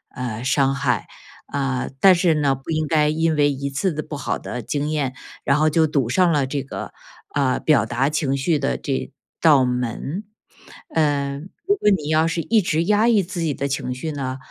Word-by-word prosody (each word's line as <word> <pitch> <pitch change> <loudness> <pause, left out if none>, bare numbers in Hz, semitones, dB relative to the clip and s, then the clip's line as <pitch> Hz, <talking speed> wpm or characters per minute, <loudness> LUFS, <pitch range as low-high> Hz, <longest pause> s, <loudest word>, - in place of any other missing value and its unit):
呃， 120 -4 -4
伤 135 +1 +2
害。 135 - -1 0.4
啊， 135 -3 -2
但 190 +5 +7
是 170 -1 +3
呢， 145 -3 +2
不 135 +4 -13
应 155 -1 0
该 150 -1 +3
因 160 +1 +1
为 145 -1 +3
1 140 0 -3
次 150 +6 -1
的 155 - -3
不 150 - -7
好 130 -4 -3
的 125 - -5
经 145 +6 -2
验， 145 -4 -1 0.3
然 140 - +2
后 155 +1 +4
就 160 +1 +3
堵 140 -5 0
上 175 +8 +3
了 145 -3 +1
这 140 0 -3
个， 135 - -7 0.4
呃， 135 -3 +1
表 140 -9 +3
达 120 +5 0
情 145 -3 0
绪 155 +4 +1
的 65 - -1
这 65 0 -3 0.3
道 145 -5 +6
门。 125 - -3 0.7
嗯， 145 0 0 0.2
如 405 - +4
果 295 - +2
你 165 -8 +1
要 155 +1 +3
是 165 +1 -1
一 220 +6 +2
直 165 -2 0
压 210 +4 +3
抑 220 -4 +4
自 180 -1 -5
己 160 -3 0
的 140 - -2
情 135 -2 -3
绪 140 +5 -5
呢， 130 -2 -4
145 Hz, 215 characters per minute, -22 LUFS, 135-160 Hz, 0.7 s, 但